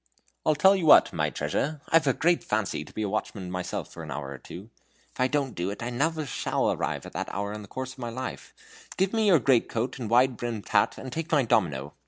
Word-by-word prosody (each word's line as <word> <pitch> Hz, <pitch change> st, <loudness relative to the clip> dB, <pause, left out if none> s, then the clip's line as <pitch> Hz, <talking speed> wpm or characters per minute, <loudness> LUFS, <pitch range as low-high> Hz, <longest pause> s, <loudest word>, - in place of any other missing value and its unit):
"I'll 155 Hz, -, +4 dB
tell 190 Hz, +7 st, +6 dB
you 180 Hz, -5 st, -1 dB
what, -, -, +7 dB
my -, -, 0 dB
treasure, 150 Hz, +1 st, -2 dB
I've 160 Hz, -2 st, +4 dB
a 135 Hz, -, +4 dB
great 170 Hz, +5 st, +2 dB
fancy 105 Hz, -4 st, -1 dB
to -, -, -14 dB
be 110 Hz, -, -3 dB
a -, -, 0 dB
watchman 100 Hz, -2 st, -3 dB
myself 90 Hz, 0 st, -4 dB
for -, -, -8 dB
an 80 Hz, -, -8 dB
hour 70 Hz, 0 st, -5 dB
or 65 Hz, -, -8 dB
two. 100 Hz, -, -11 dB, 0.4 s
If -, -, -19 dB
I 130 Hz, -, +4 dB
don't 140 Hz, -3 st, -1 dB
do 90 Hz, +2 st, -2 dB
it 100 Hz, -, -6 dB
now, 125 Hz, +6 st, 0 dB
I 155 Hz, -, -2 dB
shall 135 Hz, -, -2 dB
never -, -, +2 dB
arrive -, -, -2 dB
at -, -, -10 dB
that -, -, -3 dB
honor 100 Hz, +1 st, -3 dB
in 105 Hz, -, -6 dB
the 100 Hz, -, -11 dB
course 130 Hz, +4 st, -5 dB
of -, -, -18 dB
my 120 Hz, -2 st, -4 dB
life. 130 Hz, +3 st, -6 dB, 0.5 s
Give 190 Hz, +2 st, +1 dB
me 220 Hz, -1 st, +2 dB
your 185 Hz, -4 st, +7 dB
great 130 Hz, -4 st, +3 dB
coat 120 Hz, +4 st, -2 dB
and 115 Hz, -4 st, -4 dB
wide 125 Hz, +1 st, +4 dB
brimmed 115 Hz, -4 st, -4 dB
hat, -, -, +2 dB
and 130 Hz, -2 st, -7 dB
take 165 Hz, +1 st, -4 dB
my 145 Hz, -4 st, +4 dB
domino. 75 Hz, -11 st, 0 dB
120 Hz, 260 wpm, -27 LUFS, 100-150 Hz, 0.5 s, what